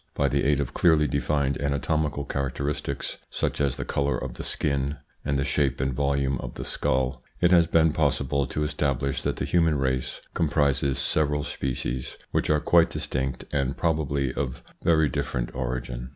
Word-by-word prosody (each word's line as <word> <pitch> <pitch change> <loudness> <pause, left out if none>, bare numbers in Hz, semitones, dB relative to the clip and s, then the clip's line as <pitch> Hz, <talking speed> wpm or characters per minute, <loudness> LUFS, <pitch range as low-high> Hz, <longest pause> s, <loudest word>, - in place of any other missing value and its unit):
By - - +2
the - - +1
aid 70 0 +3
of 70 -4 -2
clearly 80 -3 +4
defined 70 0 0
anatomical 70 0 0
characteristics, 70 +1 -3
such - - -1
as 70 -2 +2
the - - -4
colour 70 0 0
of 65 -2 -5
the - - -7
skin, 70 0 -1 0.3
and 70 - 0
the 70 - 0
shape 70 0 +1
and 65 0 0
volume 70 -1 0
of - - -6
the - - -5
skull, 65 0 0 0.2
it 90 - +4
has 85 -2 +6
been 80 -2 +4
possible 70 -2 +1
to 75 - -2
establish 70 -3 -1
that - - -1
the - - -2
human 80 -3 +3
race 65 -2 -1
comprises 70 -3 +1
several 75 0 +1
species 65 -2 -3
which - - 0
are 75 0 +4
quite 85 +2 +4
distinct 65 -1 -3
and 70 -2 0
probably 70 -5 0
of 65 -3 -3 0.2
very 80 -2 +4
different 60 -2 -2
origin. 60 -1 -4
70 Hz, 170 wpm, -26 LUFS, 65-75 Hz, 0.3 s, has